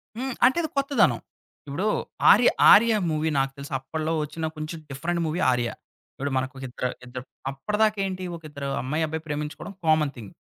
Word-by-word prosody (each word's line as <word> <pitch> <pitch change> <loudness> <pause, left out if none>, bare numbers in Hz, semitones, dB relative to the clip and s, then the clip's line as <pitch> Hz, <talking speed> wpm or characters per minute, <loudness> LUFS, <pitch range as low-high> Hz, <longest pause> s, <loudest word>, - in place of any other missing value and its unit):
హ్మ్. 260 +1 -3
అంటే 260 +6 +4
అది 315 - -2
కొత్తదనం. 275 0 +3 0.5
ఇప్పుడు 170 +9 -2 0.5
'ఆర్య' 235 +4 +6 0.2
'ఆర్య' 225 0 +7
మూవీ 155 +1 0
నాకు 135 0 0
తెలుసు. 140 +1 -8
అప్పట్లో 155 +4 -3
వచ్చిన 160 +2 -4
కొంచెం 155 +2 -5
డిఫరెంట్ 165 +5 -2
మూవీ 160 +3 -2
'ఆర్య.' 120 -1 0 0.4
ఇప్పుడు 140 +1 -4
మనకు 130 +1 -2
ఇద్దరు 125 0 -3
ఇద్దరు 125 0 -7 0.3
అప్పటిదాకా 210 +10 0
ఏంటి 185 -1 -4
ఒక 165 - -12
ఇద్దరు 140 -1 -5
అమ్మాయి 150 +5 -1
అబ్బాయి 160 0 -4
ప్రేమించుకోవడం 150 +6 -5
కామన్ 155 -2 +3
థింగ్. 110 -5 -10
155 Hz, 165 wpm, -25 LUFS, 140-185 Hz, 0.5 s, ఆర్య